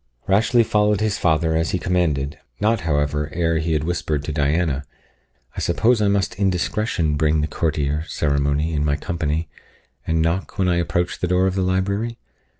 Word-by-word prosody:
Rashleigh 110 Hz, +5 st, +3 dB
followed 105 Hz, -2 st, +2 dB
his 110 Hz, -1 st, 0 dB
father, 80 Hz, -1 st, +2 dB
as 80 Hz, 0 st, +1 dB
he -, -, 0 dB
commanded, 75 Hz, -6 st, -1 dB, 0.2 s
not, 110 Hz, +2 st, +2 dB
however, 75 Hz, 0 st, 0 dB
ere 85 Hz, -1 st, +1 dB
he 80 Hz, 0 st, -1 dB
had 75 Hz, -2 st, 0 dB
whispered 80 Hz, -3 st, -2 dB
to 75 Hz, -, -4 dB
Diana, 75 Hz, -1 st, 0 dB, 0.7 s
"I -, -, -4 dB
suppose 110 Hz, +6 st, +2 dB
I 105 Hz, -, +3 dB
must 100 Hz, -1 st, 0 dB
in 100 Hz, -1 st, +3 dB
discretion 90 Hz, -3 st, -1 dB
bring 75 Hz, 0 st, +2 dB
the 75 Hz, -, 0 dB
courtier, 75 Hz, -1 st, -1 dB
Ceremony, 70 Hz, +2 st, 0 dB
in 75 Hz, -1 st, 0 dB
my 75 Hz, -1 st, +1 dB
company, 80 Hz, 0 st, -2 dB, 0.6 s
and 80 Hz, 0 st, +1 dB
knock 85 Hz, +4 st, -1 dB
when 95 Hz, -, +2 dB
I 90 Hz, -1 st, +2 dB
approach 85 Hz, +1 st, -1 dB
the 90 Hz, -, -1 dB
door 90 Hz, +1 st, +2 dB
of 95 Hz, -, +1 dB
the 95 Hz, -, -1 dB
library?" 100 Hz, +5 st, -1 dB
85 Hz, 180 wpm, -21 LUFS, 75-95 Hz, 0.7 s, Rashleigh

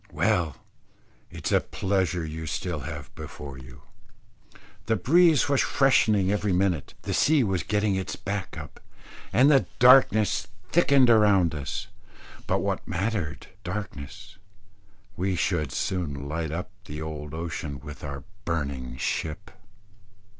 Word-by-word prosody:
Well, 80 Hz, -6 st, +1 dB, 0.7 s
it -, -, -10 dB
is -, -, 0 dB
a -, -, +5 dB
pleasure 95 Hz, -3 st, -1 dB
you 80 Hz, +1 st, -6 dB
still 90 Hz, -1 st, -3 dB
have -, -, -7 dB
before 70 Hz, -2 st, -8 dB
you. 65 Hz, -1 st, -13 dB, 1.0 s
The 110 Hz, -, +3 dB
breeze 160 Hz, -, +4 dB
was 140 Hz, -2 st, +3 dB
freshening 110 Hz, -8 st, +3 dB
every 105 Hz, -1 st, 0 dB
minute, 90 Hz, -5 st, 0 dB
the -, -, -3 dB
sea 150 Hz, -3 st, +4 dB
was 95 Hz, -5 st, 0 dB
getting 105 Hz, -1 st, 0 dB
its 95 Hz, -1 st, -2 dB
back 100 Hz, -3 st, -4 dB
up, 75 Hz, -3 st, -9 dB, 0.5 s
and 135 Hz, +2 st, +5 dB
darkness 125 Hz, -4 st, +5 dB, 0.2 s
thickening 140 Hz, -7 st, +5 dB
around 100 Hz, -7 st, +4 dB
us. 75 Hz, -3 st, -4 dB, 0.6 s
But -, -, +1 dB
what -, -, -2 dB
mattered 95 Hz, -4 st, -2 dB, 0.2 s
darkness, 95 Hz, 0 st, -7 dB, 0.8 s
we 95 Hz, +1 st, -1 dB
should 85 Hz, -2 st, 0 dB
soon 70 Hz, -7 st, -2 dB
light 80 Hz, +1 st, -3 dB
up 90 Hz, +3 st, -5 dB, 0.3 s
old 75 Hz, -1 st, -6 dB
ocean 80 Hz, -3 st, -4 dB
with 75 Hz, -3 st, -10 dB
our 70 Hz, -2 st, -6 dB, 0.2 s
burning 70 Hz, -8 st, -3 dB
ship. 80 Hz, +8 st, -3 dB
90 Hz, 125 wpm, -26 LUFS, 75-105 Hz, 1.0 s, a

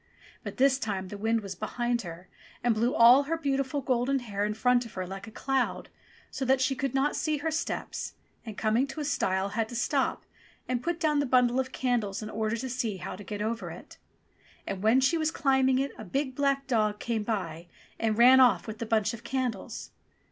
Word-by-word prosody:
But -, -, -7 dB
this 265 Hz, 0 st, +4 dB
time 195 Hz, -6 st, -3 dB
the 205 Hz, -, -7 dB
wind 225 Hz, +2 st, +1 dB
was 195 Hz, -2 st, -6 dB
behind 240 Hz, +5 st, -2 dB
her 175 Hz, -1 st, -9 dB, 0.4 s
and 240 Hz, -1 st, +3 dB
blew 235 Hz, +4 st, 0 dB
all 245 Hz, +4 st, +7 dB
her 330 Hz, -, +1 dB
beautiful 275 Hz, -2 st, -1 dB
golden 255 Hz, +1 st, +1 dB
hair 205 Hz, -5 st, -3 dB
in 210 Hz, 0 st, -2 dB
front 250 Hz, +2 st, +3 dB
of 230 Hz, -, -11 dB
her 185 Hz, -1 st, -3 dB
like 195 Hz, +3 st, -8 dB
a -, -, -9 dB
cloud, 265 Hz, +3 st, -1 dB, 0.4 s
so -, -, -4 dB
that 265 Hz, +1 st, +3 dB
she 260 Hz, +1 st, +2 dB
could 270 Hz, 0 st, -3 dB
not 275 Hz, +2 st, +1 dB
see 310 Hz, -1 st, 0 dB
her 320 Hz, +3 st, -2 dB
steps, 325 Hz, +2 st, -3 dB, 0.3 s
and, 220 Hz, -3 st, -8 dB
coming 225 Hz, +5 st, +2 dB
to 295 Hz, -, -7 dB
a 300 Hz, -, -2 dB
stile, 190 Hz, -8 st, 0 dB
had 225 Hz, +1 st, -2 dB
to 240 Hz, -, -7 dB
stop 265 Hz, +3 st, 0 dB, 0.4 s
and 250 Hz, -1 st, -1 dB
put 340 Hz, +2 st, -2 dB
down 305 Hz, -3 st, +2 dB
the 285 Hz, -, 0 dB
bundle 250 Hz, 0 st, +3 dB
of 260 Hz, 0 st, -2 dB
candles 230 Hz, -7 st, -1 dB
in 215 Hz, -, -6 dB
order 220 Hz, +1 st, -1 dB
to 260 Hz, -, -4 dB
see 235 Hz, -5 st, -2 dB
how 185 Hz, -, -6 dB
to 205 Hz, -, -10 dB
get 205 Hz, 0 st, -4 dB
over 225 Hz, +1 st, -3 dB
it. -, -, -11 dB, 0.7 s
And 190 Hz, -, -4 dB
when 225 Hz, +5 st, +4 dB
she 325 Hz, +5 st, +2 dB
was 315 Hz, 0 st, +1 dB
climbing 265 Hz, -4 st, +2 dB
it 275 Hz, +1 st, 0 dB
a -, -, -6 dB
big 265 Hz, +6 st, -2 dB
black 275 Hz, 0 st, +1 dB
dog 215 Hz, -5 st, +1 dB
came 230 Hz, 0 st, -2 dB
by 180 Hz, -6 st, -3 dB, 0.3 s
and 220 Hz, -1 st, 0 dB
ran 255 Hz, +2 st, +8 dB
off 255 Hz, -2 st, +5 dB
with 220 Hz, -1 st, -7 dB
the 230 Hz, -, -4 dB
bunch 220 Hz, 0 st, +1 dB
of 235 Hz, +1 st, -9 dB
candles 245 Hz, -4 st, -3 dB
240 Hz, 220 wpm, -28 LUFS, 215-270 Hz, 0.7 s, ran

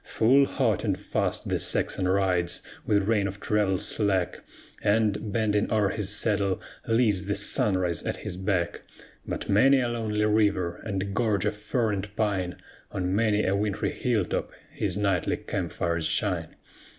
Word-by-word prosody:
Full 135 Hz, +5 st, +4 dB
hot 115 Hz, -8 st, 0 dB
and -, -, 0 dB
fast -, -, -1 dB
the -, -, 0 dB
Saxon 95 Hz, -, +1 dB
rides, 90 Hz, -2 st, +1 dB, 0.2 s
with 100 Hz, -2 st, +2 dB
rein 105 Hz, -3 st, +2 dB
of 100 Hz, +1 st, -7 dB
travel 105 Hz, -2 st, +1 dB
slack, 95 Hz, -2 st, 0 dB, 0.4 s
And, 105 Hz, 0 st, +1 dB
bending 105 Hz, 0 st, +1 dB
o'er 105 Hz, -3 st, +3 dB
his 105 Hz, -2 st, -2 dB
saddle, 100 Hz, -2 st, +1 dB, 0.3 s
leaves 110 Hz, -4 st, +2 dB
the 100 Hz, +1 st, -1 dB
sunrise 95 Hz, -4 st, +1 dB
at -, -, -3 dB
his -, -, -5 dB
back; 90 Hz, -2 st, -1 dB, 0.5 s
By -, -, -2 dB
many 135 Hz, +7 st, +5 dB
a 125 Hz, -, +1 dB
lonely 110 Hz, -3 st, -1 dB
river, 100 Hz, -5 st, +2 dB
and 100 Hz, -2 st, -3 dB
gorge 105 Hz, -3 st, +1 dB
of 105 Hz, 0 st, 0 dB
fir 110 Hz, +2 st, -1 dB
and 100 Hz, +1 st, -4 dB
pine, 100 Hz, -5 st, -1 dB, 0.4 s
On 90 Hz, 0 st, -1 dB
many 105 Hz, -1 st, +2 dB
a 95 Hz, -, +2 dB
wintry 105 Hz, -1 st, -1 dB
hill 115 Hz, -7 st, 0 dB
top, -, -, -2 dB, 0.2 s
his 100 Hz, -3 st, -2 dB
nightly 100 Hz, -4 st, +1 dB
camp -, -, -4 dB
fires 85 Hz, -2 st, -1 dB
shine. 90 Hz, -6 st, -1 dB
100 Hz, 160 wpm, -27 LUFS, 95-110 Hz, 0.5 s, many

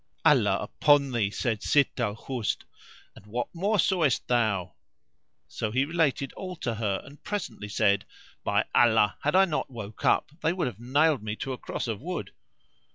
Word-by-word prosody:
"Allah -, -, +5 dB
upon 145 Hz, -2 st, +3 dB
thee," 115 Hz, -5 st, +1 dB
said 110 Hz, +1 st, -2 dB
Sitt 140 Hz, -2 st, +2 dB
al 105 Hz, -4 st, 0 dB
Husn, 120 Hz, -1 st, -3 dB, 0.5 s
"and 100 Hz, -, -15 dB
what 120 Hz, +3 st, -3 dB
more 200 Hz, +5 st, +1 dB
sawest 170 Hz, -, +2 dB
thou?" 110 Hz, -7 st, +1 dB, 0.7 s
So 110 Hz, -, -3 dB
he 130 Hz, +5 st, +1 dB
related 145 Hz, -4 st, 0 dB
all 185 Hz, -1 st, -6 dB
to 130 Hz, -8 st, -3 dB
her; 105 Hz, -3 st, -2 dB
and 145 Hz, +2 st, -15 dB
presently 200 Hz, -, -4 dB
said, 100 Hz, -1 st, +2 dB, 0.4 s
"By -, -, +1 dB
Allah 110 Hz, -3 st, +4 dB
had 150 Hz, +4 st, +1 dB
I 190 Hz, +1 st, +7 dB
not 155 Hz, -5 st, -2 dB
woke 110 Hz, -4 st, -9 dB
up -, -, +2 dB
they 165 Hz, -, +2 dB
would 180 Hz, -, -1 dB
have 110 Hz, -5 st, -5 dB
nailed 145 Hz, +3 st, +2 dB
me 105 Hz, 0 st, -4 dB
to 135 Hz, +3 st, -4 dB
a -, -, -6 dB
cross -, -, -4 dB
of 110 Hz, -2 st, -3 dB
wood!" 175 Hz, +3 st, -4 dB
125 Hz, 175 wpm, -27 LUFS, 110-155 Hz, 0.7 s, I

